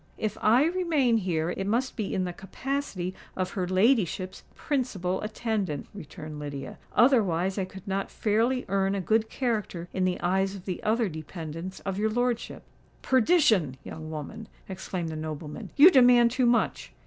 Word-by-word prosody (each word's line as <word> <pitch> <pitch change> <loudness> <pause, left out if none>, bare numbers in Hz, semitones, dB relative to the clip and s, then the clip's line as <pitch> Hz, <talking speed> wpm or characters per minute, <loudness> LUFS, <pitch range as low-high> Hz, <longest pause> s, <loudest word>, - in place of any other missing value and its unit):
"If 215 -1 -2
I 240 +7 +5
remain 320 -9 +2
here, 175 -5 -1
it 195 +2 -3
must 245 +5 0
be 215 -4 -3
in 185 - 0
the 180 -1 -3
capacity 195 -2 -4 0.2
of 185 -1 -2
her 185 -3 -2
ladyship's 185 - +1
principal 195 - -2
attendant," 215 - -2
returned 155 -4 -8
Lydia: 140 -2 -6 0.2
"otherwise 195 -7 +3
I 190 - 0
could 190 +2 -12
not 195 0 -2
fairly 230 +4 +1
earn 195 +1 +1
a - - -1
good 220 +4 +1
character 210 -9 -2
in 190 - 0
the 185 -1 0
eyes 190 +2 +1
of 185 - -10
the 185 -2 -4
other 225 +1 +1
dependants 165 +2 -7
of 195 0 -3
your 215 +1 +2
lordship." 245 +1 -1 0.4
"Perdition! 225 - +3
young 155 0 -8
woman," 160 +8 -7 0.2
exclaimed 180 -2 -4
the 160 - -5
nobleman; 155 -1 -6
"you 310 +6 +9
demand 245 -4 +6
too 250 0 +2
much!" 240 0 +1
195 Hz, 160 wpm, -27 LUFS, 175-235 Hz, 0.4 s, you